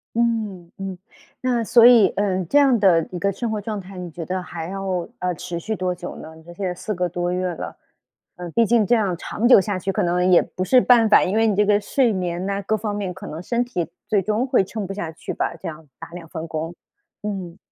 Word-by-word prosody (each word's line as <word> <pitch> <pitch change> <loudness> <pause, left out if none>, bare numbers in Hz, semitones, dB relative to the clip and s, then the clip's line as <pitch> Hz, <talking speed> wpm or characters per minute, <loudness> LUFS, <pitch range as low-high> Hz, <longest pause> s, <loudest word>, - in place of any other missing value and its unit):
嗯， 215 -7 -1
嗯， 195 -1 -5 0.5
那 245 -2 +1
所 235 +1 +7
以 235 -4 +7
呃， 190 -3 -1
这 285 - +4
样 270 -5 +4
的 175 -5 +4
一 180 - -4
个 200 +3 0
生 225 +4 -3
活 215 - -2
状 205 -1 -4
态， 190 +1 -11
你 180 -2 -6
觉 170 +1 -6
得 185 +1 -3
还 165 -2 -6
要， 190 -2 -3
呃， 180 0 -1
持 170 +1 -5
续 220 +6 -3
多 185 -2 -1
久 175 0 -7
呢？ 160 0 -10
你 160 - -16
说 175 - -12
现 195 - -7
在 - - -1
4 210 +4 -4
个 180 -1 -1
多 175 +1 -2
月 185 0 -1
了， - - -6 0.6
呃， 180 +1 -7
毕 230 - +3
竟 225 -1 +3
这 240 - +2
样 200 -6 0
长 215 +6 -1
久 245 - +8
下 195 -1 -2
去 190 +2 -2
可 - - 0
能 180 +1 +1
也 175 - +8
不 185 - -5
是 255 +7 +5
办 240 -3 +5
法， - - +6
因 185 - -1
为 225 0 +3
你 210 - +1
这 210 +1 +3
个 205 0 +3
睡 245 +1 +1
眠 180 -1 -2
呐， 200 0 -2
各 215 +2 0
方 210 -1 -3
面 200 -3 -3
可 190 +3 -10
能 160 -2 -6
身 240 +6 -1
体 175 -10 -3 0.2
最 210 -3 +2
终 215 +6 0
会 255 - +3
撑 205 +2 -5
不 195 - -5
下 170 -5 -4
去 165 - -7
吧？ - - -2
这 185 - -7
样 155 -1 -8
打 165 - -9
2 170 0 -10
份 165 -1 -6
工， 160 +2 -4 0.5
嗯。 190 -4 -5
190 Hz, 270 characters per minute, -22 LUFS, 175-215 Hz, 0.6 s, 久